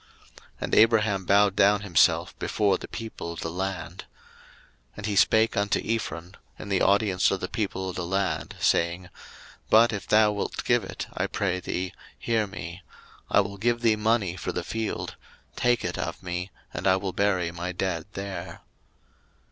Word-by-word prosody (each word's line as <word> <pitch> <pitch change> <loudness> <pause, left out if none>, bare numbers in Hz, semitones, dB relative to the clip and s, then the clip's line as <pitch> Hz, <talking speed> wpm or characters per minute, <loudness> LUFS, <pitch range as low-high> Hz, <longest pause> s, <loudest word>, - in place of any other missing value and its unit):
01:023:012 - - -15 0.2
And - - -4
Abraham 110 -4 +4
bowed 100 +1 +4
down 100 +1 +4
himself 100 -5 +2
before 100 -2 +1
the - - -8
people 110 -7 -6
of 85 - -8
the 80 - -3
land. 90 -1 -4 0.9
01:023:013 - - -28
And 105 - -6
he 105 -2 -1
spake 110 +3 +4
unto 100 0 +1
Ephron 95 -6 -3 0.2
in - - -8
the 95 -2 +1
audience 100 -2 +3
of 95 - -1
the 90 - -3
people 95 -4 -3
of 95 - -5
the 90 - -2
land, 95 +1 -1
saying, 85 +2 +1 0.6
But 115 +1 +6
if 100 -2 -5
thou 105 0 +5
wilt 100 -1 -3
give - - +2
it, - - -6
I - - -1
pray 95 -2 -1
thee, 90 0 -3 0.2
hear 110 -3 0
me: 85 -2 -8 0.5
I - - +5
will 100 0 -5
give 120 +3 0
thee 115 -2 +4
money 105 -4 +1
for 85 - -4
the 90 - -3
field; 110 +4 -4 0.4
take 120 -1 +1
it - - -3
of - - -4
me, 90 +1 -4 0.2
and - - -2
I 95 - +6
will 95 -1 -3
bury 95 -4 +1
my 85 +1 -4
dead 90 -2 -2
there. 95 -3 -6
100 Hz, 180 wpm, -26 LUFS, 90-105 Hz, 0.9 s, But